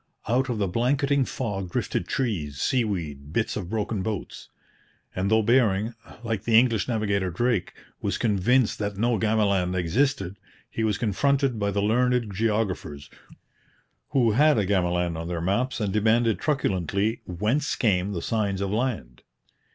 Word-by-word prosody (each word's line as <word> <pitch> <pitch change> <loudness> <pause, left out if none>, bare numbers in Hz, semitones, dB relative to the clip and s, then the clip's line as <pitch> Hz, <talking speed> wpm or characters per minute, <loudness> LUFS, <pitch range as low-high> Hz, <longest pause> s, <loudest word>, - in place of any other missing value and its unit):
Out 130 +4 +1
of 120 - -1
the 100 -2 0
blanketing 135 - +1
fog 100 -9 -4
drifted - - -2
trees, 85 - -2
seaweed, 85 - -1
bits 110 +6 -1
of 90 -4 -5
broken 110 -1 -2
boats. 105 -1 -5 0.7
And 95 +2 0
though 110 0 +3
Bering, 110 -2 +2 0.3
like 110 -3 -2
the 110 0 +4
English 115 -3 +3
navigator 100 -5 0
Drake, 115 +2 -1 0.3
was - - -1
convinced 115 +3 +2
that 105 -1 -3
no 115 0 +1
Gamaland 100 -4 +1
existed, 100 - 0 0.3
he 115 - -2
was 105 -2 +1
confronted 130 +3 +1
by 100 -1 0
the 100 0 -1
learned 120 0 +1
geographers, 95 -9 -2 1.0
who 125 -5 +3
had 150 +5 +4
a 105 - +2
Gamaland 90 -3 0
on 85 - -5
their 85 -1 -3
maps 100 +10 -1
and 100 -3 -1
demanded 110 +1 +2
truculently, 105 - 0
whence 110 - 0
came 100 -4 +1
the 85 -4 -4
signs 105 -4 -1
of 100 -1 -2
land? 105 - -2
105 Hz, 150 wpm, -25 LUFS, 95-120 Hz, 1.0 s, the